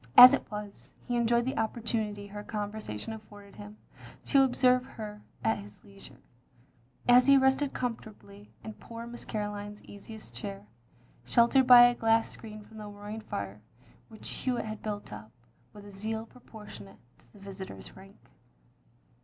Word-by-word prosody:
As 250 +2 +13
it - - -1
was, 210 -1 -8
he 245 - -1
enjoyed 235 0 +2
the 260 - -2
opportunity 220 -2 -2
her 205 +1 -8
conversation 210 - -5
afforded 205 -2 -13
him 210 +1 -10 0.5
to 275 - +5
observe 250 -1 +3
her 215 -5 -9 0.2
at 220 - +1
his 205 0 -13
leisure; 195 -1 -14 0.8
as 245 +1 +7
he 275 0 +8
rested 265 +1 +2
comfortably 210 -4 -6
in 220 - -7
poor 230 +2 -9
Miss 240 0 -9
Caroline's 205 -1 -5
easiest 205 - -11
chair, 100 -4 -7 0.6
sheltered 245 +2 +4
by 245 -1 +11
a 245 0 +6
glass 225 -1 +2
screen 215 -1 -10
from 220 +1 -15
the 210 - -7
roaring 205 +2 -8
fire 100 - -6 0.5
which 220 -1 -9
Hewitt 250 -3 -2
had 215 0 -6
built 205 - -5
up, 105 +1 -10 0.4
with 205 -1 -13
a 205 - -11
zeal 220 +3 -4
pro 250 +2 -19
portionate 160 - -12 0.2
to - - -24
the - - -18
visitor's 195 -1 -9
rank. 195 +1 -15
215 Hz, 155 wpm, -30 LUFS, 205-235 Hz, 0.8 s, As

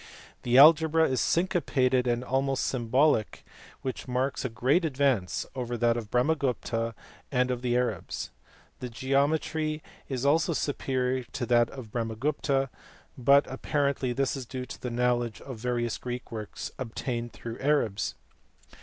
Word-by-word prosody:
The 125 +1 +2
algebra 160 +2 +7
is 130 -3 0
syncopated 130 -8 +1
and 120 0 0
almost 135 +1 0
symbolic, 125 -1 +1 0.4
which 130 0 -4
marks 130 +2 -1
a 130 - -1
great 130 - +2
advance 135 - +1
over 120 -2 -3
that 115 0 +3
of 115 -3 -5
Brahmagupta 125 -4 0 0.4
and 125 -1 +2
of 125 -1 -2
the 120 -1 0
Arabs. 125 0 -2 0.5
The 125 - -5
geometry 150 +5 0 0.3
is 130 -1 -2
also 160 +4 +3
superior 130 -3 -1
to 125 - -2
that 120 -1 +3
of 125 -6 -9
Brahmagupta, 135 +4 -1 0.5
but 140 +3 +5
apparently 140 -1 -1
this 135 +3 0
is 130 -3 -6
due 130 0 -5
to - - -10
the 125 - -3
knowledge 120 -1 0
of 130 -5 -8
various 120 -1 -1
Greek 125 0 -6
works 110 -2 -6
obtained 120 -1 -3
through 115 0 -7
the - - -6
Arabs. 115 -8 +1
130 Hz, 145 wpm, -28 LUFS, 120-140 Hz, 0.5 s, algebra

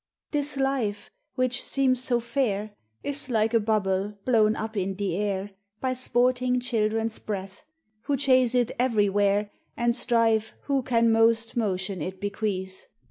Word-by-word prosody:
This 290 -1 0
Life, 265 -7 -1 0.2
which 255 -1 +1
seems 255 -2 +1
so 245 -2 +1
fair, 215 -4 -1 0.3
Is 285 -1 -3
like 225 -1 +1
a 230 - +5
bubble 205 -2 0
blown 220 -3 +3
up 220 0 -5
in 195 -1 -1
the 195 -3 -2
air 200 0 -2 0.3
By 260 -1 -1
sporting 250 0 +1
children's 225 -2 -1
breath, 195 +3 -6 0.4
Who 285 - +1
chase 255 -2 +3
it 245 -1 +2
everywhere 205 -3 +2 0.3
And 235 0 +1
strive 225 -3 +1
who 275 -2 0
can 230 -2 +2
most 225 0 +3
motion 195 -5 -1
it 185 +4 -5
bequeath. 195 -2 -4
225 Hz, 140 wpm, -26 LUFS, 205-250 Hz, 0.4 s, a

